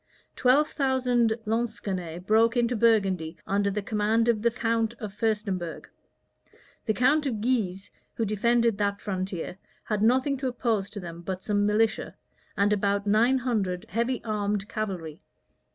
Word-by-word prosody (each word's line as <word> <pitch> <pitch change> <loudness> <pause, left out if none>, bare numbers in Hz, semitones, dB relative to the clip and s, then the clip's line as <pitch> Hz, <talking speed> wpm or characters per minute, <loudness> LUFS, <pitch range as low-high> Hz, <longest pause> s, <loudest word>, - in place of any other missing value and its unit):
Twelve 270 +4 +4
thousand 250 -5 +1
Lansquenets 200 -7 -3
broke 225 +3 +3
into 240 0 +2
Burgundy 195 -8 +2
under 200 +1 +1
the 205 +1 -3
command 220 +2 +1
of 230 -3 +2
the 235 - +3
count 230 -1 -1
of 210 -3 -6
Furstenberg. 205 -6 -2 1.0
The 220 - +1
count 285 +4 +3
of 230 -5 -2
Guise, 205 -5 -1 0.2
who 225 - 0
defended 230 +1 +2
that 200 -1 0
frontier, 185 -2 -4 0.3
had 210 -2 -1
nothing 260 +5 +3
to 260 0 -2
oppose 230 -5 -1
to 205 0 -7
them 170 -2 -8
but 185 +1 -5
some 205 -1 +1
militia, 215 +1 +1 0.4
and 205 +1 +3
about 200 0 0
nine 225 +6 +4
hundred 210 -8 -1
heavy 235 +4 -1
armed 205 -2 -1
cavalry. 185 -9 -5
215 Hz, 145 wpm, -27 LUFS, 200-235 Hz, 1.0 s, Twelve